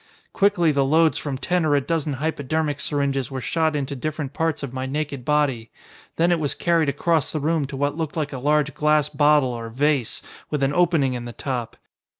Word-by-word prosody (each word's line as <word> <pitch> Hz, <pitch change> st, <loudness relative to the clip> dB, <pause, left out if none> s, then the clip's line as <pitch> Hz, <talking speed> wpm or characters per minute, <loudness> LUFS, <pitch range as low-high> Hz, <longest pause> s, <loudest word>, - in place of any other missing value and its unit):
"Quickly 195 Hz, -5 st, +3 dB
the 140 Hz, -1 st, +2 dB
loads 155 Hz, +2 st, +3 dB
from 140 Hz, -3 st, -4 dB
ten 180 Hz, +5 st, 0 dB
or 150 Hz, -2 st, +3 dB
a -, -, +4 dB
dozen 155 Hz, +1 st, -2 dB
hypodermic 150 Hz, +1 st, -2 dB
syringes 140 Hz, -3 st, -1 dB
were 135 Hz, -1 st, -4 dB
shot 160 Hz, +4 st, 0 dB
into 140 Hz, -1 st, -2 dB
different 145 Hz, 0 st, -4 dB
parts 160 Hz, -3 st, -1 dB
of 135 Hz, -3 st, -5 dB
my 130 Hz, 0 st, -3 dB
naked 140 Hz, -2 st, -3 dB
body. 135 Hz, -5 st, 0 dB, 0.5 s
Then 170 Hz, +2 st, +2 dB
it 175 Hz, -, +2 dB
was 145 Hz, -3 st, -1 dB
carried 165 Hz, -4 st, +2 dB
across 155 Hz, +2 st, 0 dB
the 155 Hz, -, -2 dB
room 155 Hz, -1 st, 0 dB
to 135 Hz, -, -7 dB
what 145 Hz, +1 st, 0 dB
looked 160 Hz, -1 st, -3 dB
like 150 Hz, -2 st, -2 dB
a 130 Hz, -, -4 dB
large 150 Hz, +2 st, +1 dB
glass 150 Hz, -1 st, +2 dB
bottle, 145 Hz, -4 st, +3 dB
or 115 Hz, -1 st, -6 dB
vase, 135 Hz, 0 st, 0 dB, 0.3 s
with 150 Hz, -2 st, -1 dB
an 135 Hz, +1 st, +1 dB
opening 165 Hz, -6 st, +2 dB
in 120 Hz, -1 st, -5 dB
the 120 Hz, -, -7 dB
top. 120 Hz, -1 st, -4 dB
145 Hz, 205 wpm, -23 LUFS, 135-155 Hz, 0.5 s, a